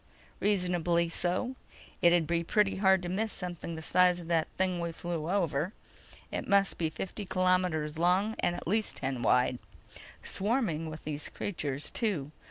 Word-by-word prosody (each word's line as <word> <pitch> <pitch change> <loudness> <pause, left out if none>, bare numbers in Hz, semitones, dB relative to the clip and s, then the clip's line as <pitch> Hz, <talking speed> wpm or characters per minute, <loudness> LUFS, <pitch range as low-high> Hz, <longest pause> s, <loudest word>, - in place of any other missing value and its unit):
"Reasonably 175 -4 +1
so. 185 +10 -1 0.5
It'd 170 -1 +5
be 170 +1 0
pretty 200 +3 +2
hard 190 -2 +4
to - - -3
miss 215 +4 -1
something 175 -3 -4
the 160 - -7
size 180 +1 +4
of 170 - -9
that 165 -2 +2
thing 185 -1 +1
we 170 0 -2
flew 165 -1 -4
over. 175 -2 0 0.6
It - - -3
must 200 -1 +3
be 165 -2 +1
fifty 190 +6 -5
kilometers 180 -5 +1
long 185 +5 +3
and 175 - +1
at - - -7
least 215 +4 +1
ten 130 -2 -3
wide. 125 +1 +3 0.6
Swarming 195 - -1
with 155 0 -8
these 150 -1 -4
creatures, 145 -7 -3
too. 175 - -1
175 Hz, 160 wpm, -30 LUFS, 160-190 Hz, 0.6 s, It'd